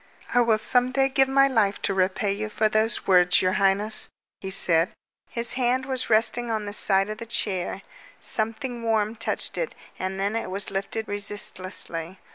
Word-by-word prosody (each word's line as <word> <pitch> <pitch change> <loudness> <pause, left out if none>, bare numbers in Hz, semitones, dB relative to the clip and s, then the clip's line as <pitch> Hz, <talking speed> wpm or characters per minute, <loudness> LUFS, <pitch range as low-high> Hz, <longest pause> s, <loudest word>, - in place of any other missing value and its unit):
"I 245 - +4
will 230 -2 +3
some 245 +3 +1
day 270 0 +2
give 270 0 +3
my 275 +1 +4
life 215 -6 +1
to - - 0
repay 190 +2 0
you 215 +1 -4
for 215 +1 +1
those 215 +2 +1
words, 180 -2 +4
your 185 - +1
highness," 200 +2 +2 0.3
he 190 - -6
said. 175 -1 +3 0.4
Her 235 - -1
hand 255 +1 0
was 260 -1 -2
resting 230 +2 +2
on 215 -2 -2
the 205 - -6
side 195 0 +2
of 215 - -7
the 230 - -8
chair. 195 -5 -2 0.4
Something 230 +3 0
warm 220 -1 0
touched 225 - -2
it, - - -3 0.2
and 190 +1 -4
then 200 +3 -1
it 230 - -3
was 195 +1 -5
lifted 200 +3 -3
resistlessly. 190 -4 -2
215 Hz, 180 wpm, -24 LUFS, 195-235 Hz, 0.4 s, I